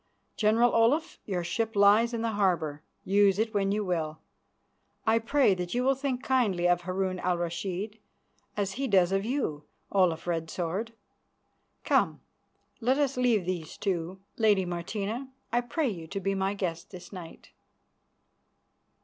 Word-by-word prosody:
General 230 +3 +3
Olaf, 265 +9 +2
your 180 -4 -2
ship 225 +6 -2
lies 205 +4 +5
in 230 -1 -3
the 230 - 0
harbour; 175 -8 0 0.2
use 200 0 +4
it 220 +1 0
when 195 -1 +1
you 210 0 0
will. 160 -4 -2 0.9
I 225 +1 +4
pray 250 -1 +3
that 180 +2 -4
you 250 - +1
will 270 +1 +4
think 270 -2 -3
kindly 210 -10 +2
of 175 0 +3
Harun 185 +1 -2
al 180 -1 0
Rashid, 185 +5 -3 0.6
as 200 -2 0
he 270 +6 -2
does 190 -5 +4
of 195 +1 0
you, 225 - -2 0.3
Olaf 180 -5 +2
Red 165 -2 -2
Sword. 190 +8 -3 0.9
Come, - - +2 0.6
let 250 +3 +2
us 280 -2 +1
leave 240 -7 +2
these 175 -3 -4
two. 185 -1 -2 0.2
Lady 210 -4 +3
Martina, 200 +8 -4 0.2
I 240 - +2
pray 255 +4 -1
you 170 -6 -6
to 195 - -4
be 195 0 -1
my 195 +1 0
guest 175 -3 -3
this 185 +1 -11
night." 175 -3 -10
195 Hz, 155 wpm, -28 LUFS, 175-230 Hz, 0.9 s, lies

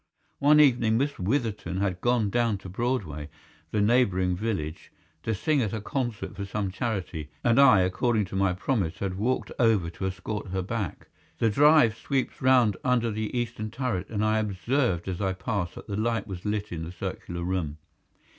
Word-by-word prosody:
One 150 +2 +6
evening 120 -6 +4
Miss 140 +3 -1
Witherton 105 -3 -1
had 95 -2 -1
gone 120 -4 +2
down 115 -2 +1
to 95 - -10
Broadway, 90 - -2 0.4
the 105 +4 0
neighbouring 100 -5 +3
village, 90 -7 -4 0.3
to 110 - -1
sing 150 +7 +1
at 110 -3 -1
a 110 - -2
concert 120 0 -3
for 100 - -4
some 100 0 -3
charity, 95 - -3
and 120 +2 +4
I, 125 -9 +7
according 105 +4 +1
to 95 - -8
my 95 -1 +2
promise, 95 -3 -1
had 100 -2 -2
walked 120 +7 -1
over 110 -8 +3
to 95 +2 -3
escort 95 +3 -4
her 95 0 -2
back. 100 -3 -4 0.3
The 115 - +2
drive 145 -2 +5
sweeps 135 +2 -2
round 125 -6 +4
under 120 -2 +2
the 110 +3 -3
eastern 115 -2 -3
turret, 115 -5 -3
and 105 -1 -1
I 110 0 +2
observed 105 - 0
as 95 0 -3
I 95 -1 +1
passed 95 -1 -3
that - - -9
the 100 - -4
light 115 +2 0
was 95 -2 -7
lit 105 0 -2
in 80 -2 -4
the 85 - -6
circular 85 -1 -5
room. 85 -5 -2
105 Hz, 185 wpm, -27 LUFS, 95-120 Hz, 0.4 s, I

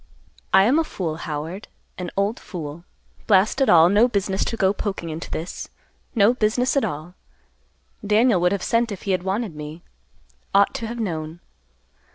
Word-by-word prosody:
"I 190 - +6
am 255 +10 +4
a - - +2
fool, 170 - -4
Howard, 160 +6 -5 0.3
an 180 -1 -5
old 200 +3 0
fool. 165 -2 -8 0.4
Blast 210 +6 +3
it 270 - +3
all; 165 -1 +7
no 205 +6 +5
business 195 -4 -1
to 230 - -3
go 195 -2 +3
poking 195 -5 -4
into 160 +2 -6
this; 165 +3 -5 0.5
no 220 +1 +5
business 245 +3 +1
at 275 - +2
all! 155 +4 -4 0.9
Daniel 210 -1 +3
would 180 0 +3
have 200 -2 -1
sent 230 0 +1
if 200 - -7
he 200 - -1
had 185 - +1
wanted 195 -1 -2
me. 150 +2 -8 0.7
Ought 200 0 +5
to 245 -4 -4
have 235 +1 -6
known. 165 -5 -4
195 Hz, 175 wpm, -23 LUFS, 170-220 Hz, 0.9 s, all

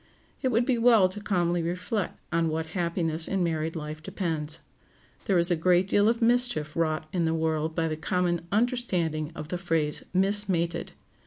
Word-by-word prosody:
It 260 - +1
would 240 -1 +2
be 245 -2 +1
well 230 -5 +6
to 205 +3 -7
calmly 175 -3 0
reflect 180 +5 -3
on 165 -1 +1
what 160 0 -3
happiness 170 -2 0
in 195 -2 0
married 160 -1 -2
life 155 0 -6
depends. 160 -3 -2 0.6
There 195 - +2
is 170 +1 +2
a - - +4
great 180 +3 +3
deal 205 +2 +3
of 230 0 0
mischief 235 -11 +2
wrought 155 -1 -1
in 175 -3 +1
the 160 0 +1
world 160 0 -1
by 165 -1 0
the 155 - -2
common 175 0 -1
understanding 185 - 0
of 150 - -7
the 180 - -3
phrase 165 -4 0
"mismated." 190 -3 +1
170 Hz, 175 wpm, -27 LUFS, 160-195 Hz, 0.6 s, well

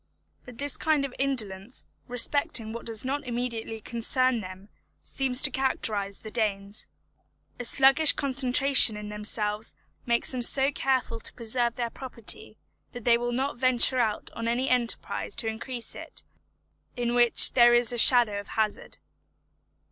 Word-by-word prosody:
But 245 -2 -13
this 285 +1 -2
kind 305 -3 0
of 265 - -8
indolence 230 -5 -2 0.2
respecting 245 -1 -1
what 235 - -8
does 225 +1 0
not 285 +3 -3
immediately 235 -2 -5
concern 240 +2 -1
them 185 +1 -11 0.4
seems 265 -1 -1
to 275 - -1
characterise 215 -7 -3
the 215 - -9
Danes. 205 -2 -3 0.7
A - - -4
sluggish 270 +5 +5
concentration 265 -3 +3
in 210 0 -8
themselves 210 +1 -3 0.3
makes 235 0 +1
them 255 -2 -4
so 270 +3 +2
careful 260 -4 -2
to - - -3
preserve 235 0 -1
their 235 -2 -4
property, 230 -4 -3 0.4
that 245 -2 -10
they 235 -1 +5
will 240 +1 -3
not 265 +2 -3
venture 255 0 +3
on 230 0 -3
any 245 +3 -1
enterprise 240 -2 -1
to - - -4
increase 230 +2 -5
it - - -8 0.7
in 240 -1 -2
which 240 -1 +5
there 240 -1 +5
is 240 0 +5
a - - -3
shadow 230 -5 +6
of 205 - -10
hazard. 215 -1 -3
240 Hz, 150 wpm, -26 LUFS, 220-260 Hz, 0.7 s, shadow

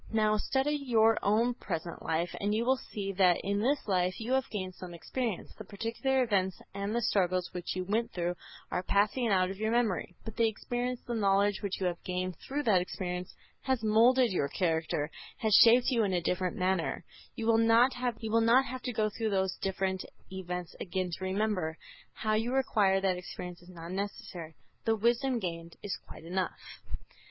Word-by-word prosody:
Now, 215 -1 +3
study 265 +6 0
your 230 -6 +3
own 225 +4 +2
present 170 -6 -5
life 165 +2 -1
and 205 +1 +1
you 230 +2 0
will 260 +1 +3
see 195 -2 -3
that 180 -2 +5
in 200 +1 0
this 265 +5 0
life 185 -2 +1
you 230 +2 -4
have 265 -1 +1
gained 185 -3 -4
some 180 -1 -9
experience. 230 +3 -3
The 215 - -9
particular 230 +6 0
events 190 -5 0
and 200 +3 -3
the 235 - 0
struggles 185 -3 +1
which 180 0 -4
you 185 - -1
went 225 +4 0
through 175 0 -1 0.4
are 180 - 0
passing 210 +6 +1
out 185 -3 +2
of 195 - -7
your 220 0 0
memory, 225 -6 0
but 225 - -7
the 230 -1 +4
experience, 245 +3 -3
the 240 - -3
knowledge 200 -2 +2
which 200 -2 -3
you 190 - -1
have 175 -1 -2
gained 185 0 -2
through 290 +2 -3
that 200 -7 +4
experience, 180 0 -4 0.3
has 260 -4 0
moulded 235 +3 +5
your 160 -6 +1
character, 160 -2 -1 0.3
has 220 -2 0
shaped 240 +3 +5
you 235 -3 +3
in 195 -2 0
a 180 - +2
different 180 +4 -1
manner. 185 -3 0 0.3
You 225 - -4
will 225 0 +4
not 230 +3 +5
have 245 -2 -2
to 235 +3 +2
go 215 -1 +1
through 220 +1 -2
those 190 -2 0
different 190 -1 -1 0.3
events 180 -2 -5
again 185 -1 -2
to 180 - -5
remember; 190 -4 -1 0.4
how 215 0 -1
you 230 +4 0
acquired 200 -7 +2
that 185 -2 +2
experience 180 0 -7
is 175 - -16
not 170 -1 -9
necessary; 185 -4 -5 0.3
the 225 - +2
wisdom 240 +4 +2
gained 170 -5 -5
is 200 -1 -2
quite - - -11
enough. 180 +1 -2
200 Hz, 185 wpm, -31 LUFS, 185-230 Hz, 0.4 s, that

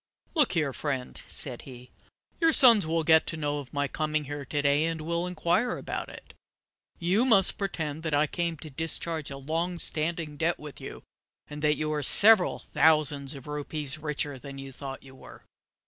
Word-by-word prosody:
"Look 300 -6 +3
here, 150 -6 0
friend," 135 -3 -4
said 125 -4 -2
he. 125 -2 -13 0.5
"Your 330 -1 +4
sons 235 - +6
will 165 0 0
get 160 0 +4
to 165 - -4
know 145 -1 -2
of 135 -3 -10
my 145 -1 -1
coming 155 +1 -2
here 145 0 -7
to 145 +3 -2
day, 145 +2 +2
and 165 -1 -3
will 170 +2 -2
inquire 180 +7 0
about - - -5
it. - - -13 0.6
You 185 +7 +1
must 220 -7 +3
pretend 160 -6 -4
that 160 -2 -3
I 145 +1 +3
came 170 +1 -3
to 155 +1 -10
discharge 160 +1 -1
a 135 - -7
long 165 +6 -3
standing 160 -2 -1
debt 165 +3 0
with 150 -3 -11
you, - - -9 0.4
and 150 0 -9
that 150 0 +2
you 155 0 -2
are 150 - -2
several 205 - +6
thousands 150 -3 +1
of 135 - -11
rupees 150 0 -4
richer 150 -2 -3
than 140 +1 -10
you 135 0 -8
thought 135 0 -8
you 135 -1 -14
were. 130 - -14
155 Hz, 190 wpm, -27 LUFS, 145-170 Hz, 0.6 s, sons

